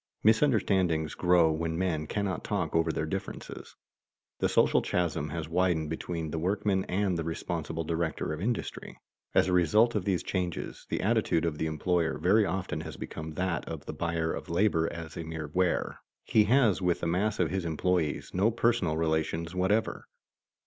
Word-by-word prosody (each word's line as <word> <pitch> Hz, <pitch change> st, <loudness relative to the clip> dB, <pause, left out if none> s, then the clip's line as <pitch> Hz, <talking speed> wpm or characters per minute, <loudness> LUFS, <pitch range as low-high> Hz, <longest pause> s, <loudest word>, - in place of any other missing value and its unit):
Misunderstandings 95 Hz, -, +3 dB
grow 90 Hz, -3 st, +4 dB
when 80 Hz, +1 st, -2 dB
men 85 Hz, -4 st, -1 dB
cannot 100 Hz, -2 st, -2 dB
talk -, -, -2 dB
over 80 Hz, 0 st, +3 dB
their 80 Hz, -, -2 dB
differences. 95 Hz, +5 st, -6 dB, 0.6 s
The -, -, +2 dB
social -, -, +4 dB
chasm 80 Hz, -4 st, -1 dB
has 80 Hz, +2 st, -4 dB
widened 85 Hz, -2 st, +1 dB
between 80 Hz, -1 st, -4 dB
the 80 Hz, -, -2 dB
workmen 95 Hz, +2 st, 0 dB
and 95 Hz, -2 st, 0 dB
the -, -, -1 dB
responsible 80 Hz, 0 st, -3 dB
director 80 Hz, -1 st, -2 dB
of 75 Hz, -, -5 dB
industry. 115 Hz, +4 st, -3 dB, 0.4 s
As -, -, +5 dB
a 90 Hz, -, +1 dB
result 105 Hz, +7 st, +4 dB
of 105 Hz, -, 0 dB
these 95 Hz, -3 st, 0 dB
changes, 90 Hz, -2 st, -3 dB
the -, -, -1 dB
attitude 80 Hz, -, +2 dB
of 75 Hz, -3 st, -2 dB
the 80 Hz, -, 0 dB
employer 80 Hz, +1 st, 0 dB
very 100 Hz, +3 st, +3 dB
often 95 Hz, +2 st, -3 dB
has -, -, -8 dB
become 80 Hz, 0 st, -6 dB
that 90 Hz, 0 st, -1 dB
of -, -, -6 dB
the -, -, -5 dB
buyer 85 Hz, -1 st, -1 dB
of -, -, -6 dB
labor 85 Hz, -2 st, +2 dB
as 85 Hz, -2 st, -7 dB
a 85 Hz, -, -3 dB
mere 80 Hz, -2 st, -5 dB
ware. 90 Hz, -1 st, 0 dB, 0.2 s
He 105 Hz, -1 st, +4 dB
has 115 Hz, -4 st, +3 dB
with 90 Hz, -2 st, +1 dB
the -, -, -1 dB
mass 100 Hz, +5 st, 0 dB
of 85 Hz, -3 st, +1 dB
his 95 Hz, -1 st, -1 dB
employees 85 Hz, -1 st, -1 dB
no 95 Hz, +5 st, +3 dB
personal 115 Hz, -8 st, +1 dB
relations 80 Hz, +1 st, -1 dB
whatever. 95 Hz, +4 st, 0 dB
85 Hz, 175 wpm, -29 LUFS, 80-95 Hz, 0.6 s, As